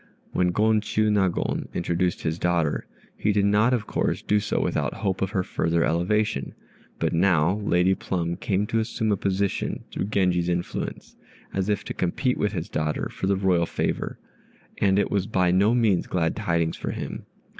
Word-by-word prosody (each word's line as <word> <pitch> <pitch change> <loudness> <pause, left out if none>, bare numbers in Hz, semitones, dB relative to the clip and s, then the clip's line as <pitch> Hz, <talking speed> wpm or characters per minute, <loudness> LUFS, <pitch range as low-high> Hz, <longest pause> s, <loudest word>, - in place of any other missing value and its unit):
When 90 - +2
Gon 110 +4 +3
Chiûnagon 105 -4 0
introduced 85 +1 0
his 80 +1 -1
daughter, 85 -4 0 0.3
he 105 - +1
did 100 -1 +2
not 105 +4 +4
of 120 -4 0
course - - -1
do 105 - +2
so 105 - -1
without - - -1
hope 95 -3 -2
of 95 - +1
her 95 -2 0
further 85 -1 0
elevation; 85 -1 0 0.4
but - - 0
now 85 +1 +3
Lady 95 -3 +2
Plum 85 -3 -2
came 95 +2 0
to 115 +2 0
assume 110 0 -1
a - - +3
position 95 0 -1
through - - -2
Genji's 90 -4 +1
influence, 85 0 -4 0.4
as 95 +1 -1
if 105 - 0
to - - -5
compete 125 +8 0
with 105 0 0
his 85 -4 -3
daughter 75 -1 -2
for 95 - -4
the 100 - +3
royal 90 -3 +2
favor; - - -2 0.6
and 95 -1 +3
it 100 - +1
was 100 -1 0
by 90 -5 +2
no 100 +6 +4
means 110 -7 +2
glad 80 -2 0
tidings 85 -1 0
for - - -4
him. - - -5
95 Hz, 175 wpm, -25 LUFS, 85-105 Hz, 0.6 s, not